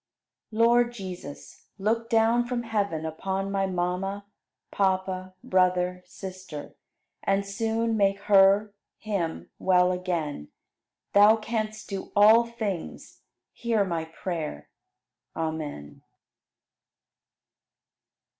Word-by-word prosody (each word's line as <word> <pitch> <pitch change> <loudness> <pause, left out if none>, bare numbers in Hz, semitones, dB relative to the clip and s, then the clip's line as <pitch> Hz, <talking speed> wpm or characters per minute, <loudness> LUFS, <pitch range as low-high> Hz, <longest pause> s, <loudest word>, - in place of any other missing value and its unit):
74. 230 +1 +3
Lord 240 0 +4
Jesus, 180 -9 -9
look 225 +3 0
down 230 +2 +3
from 240 -1 -2
heaven 200 -8 -1
upon 190 +5 -3
my 195 -1 0
mama 185 +2 -2 0.5
(papa, 185 -1 -1
brother, 180 -1 +2
sister) 185 -5 -8 0.5
and 195 0 +1
soon 225 +3 -1
make 200 -2 +2
her 200 +1 +5 0.2
(him) 195 -7 -3
well 180 -1 +4
again. 170 - -3 0.7
Thou 205 +2 +7
canst 215 -1 -4
do 195 -2 -6
all 215 +3 +7
things; 215 -7 -5 0.3
hear 225 -4 0
my 165 -3 -2
prayer! 160 - -5 0.7
Amen. 155 - -5
195 Hz, 95 wpm, -27 LUFS, 180-215 Hz, 0.7 s, Thou